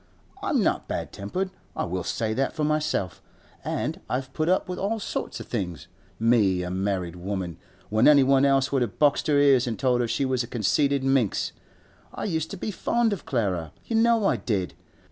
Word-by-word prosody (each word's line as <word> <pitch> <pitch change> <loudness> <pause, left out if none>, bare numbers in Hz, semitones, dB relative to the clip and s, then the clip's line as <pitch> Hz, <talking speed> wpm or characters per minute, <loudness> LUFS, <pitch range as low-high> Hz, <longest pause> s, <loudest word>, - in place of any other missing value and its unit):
I'm - - +1
not - - 0
bad - - -4
tempered, 185 - -3 0.2
I - - -1
will 90 +1 -3
say 110 -1 -1
that 135 +4 0
for 155 - -2
myself, 150 - -1 0.4
an' - - -3
I've 130 +1 -3
put 155 +2 0
up 185 - +2
with 180 0 -4
all 220 +3 -1
sorts - - -4
of - - -7
things 90 - -4 0.3
(me, 105 -6 +3
a 90 - -4
married 95 -2 -2
woman), 90 -1 -4 0.3
when 110 +2 +4
anyone 135 -2 +6
else 135 -1 +3
would 135 -2 +1
have 120 -4 -2
boxed 145 -2 +3
her 150 -2 +3
ears 140 -3 +5
and 115 - -2
told 125 -2 +2
her 120 - 0
she 135 +4 0
was 130 -2 +1
a 120 - -4
conceited 140 +4 +1
minx. 135 -6 +1 0.6
I - - -4
used 160 -5 -1
to 200 - -6
be 210 - -3
fond 230 +3 +1
of 195 - -7
Clara; 95 - -1
you 230 - -2
know 230 -1 +4
I 135 - +3
did. 100 -3 -2
130 Hz, 200 wpm, -26 LUFS, 100-150 Hz, 0.6 s, anyone